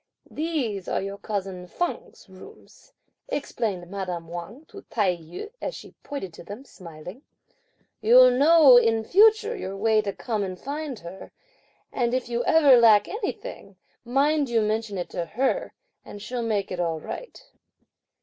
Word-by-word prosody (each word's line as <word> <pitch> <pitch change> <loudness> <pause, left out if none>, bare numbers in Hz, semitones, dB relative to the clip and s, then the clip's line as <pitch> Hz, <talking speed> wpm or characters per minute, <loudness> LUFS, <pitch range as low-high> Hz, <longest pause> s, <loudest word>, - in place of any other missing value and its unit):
"These 275 - -3
are - - 0
your 195 +1 -6
cousin 190 -4 -5
Feng's 355 - -5
rooms," 305 - -16 0.4
explained 220 - -3
madame 180 -4 -5
Wang 175 - -8
to 400 - -11
Tai 195 -5 +1
yü, 170 - -9
as - - -4
she - - -12
pointed 235 -12 -6
to - - -11
them 205 +9 -9
smiling. 180 - -11 0.8
"You'll 250 +3 +7
know 285 0 +7
in 225 -2 +3
future 435 - +4
your 195 - -6
way 220 +1 +3
to 205 -1 -3
come 215 +1 -3
and 185 -2 -4
find 285 -1 -5
her; 180 -1 -11 0.6
and 240 0 0
if 255 -1 -3
you 240 0 -1
ever 305 -7 +6
lack 215 -3 +6
anything, 420 - -6 0.3
mind 280 +3 +1
you 230 -1 +2
mention 215 -1 -2
it 175 - -5
to 175 - -3
her, 265 - -1 0.3
and 205 - -10
she'll 240 +4 -5
make 215 -4 -1
it 180 - -4
all 165 -2 -1
right." - - -8
225 Hz, 155 wpm, -25 LUFS, 190-285 Hz, 0.8 s, You'll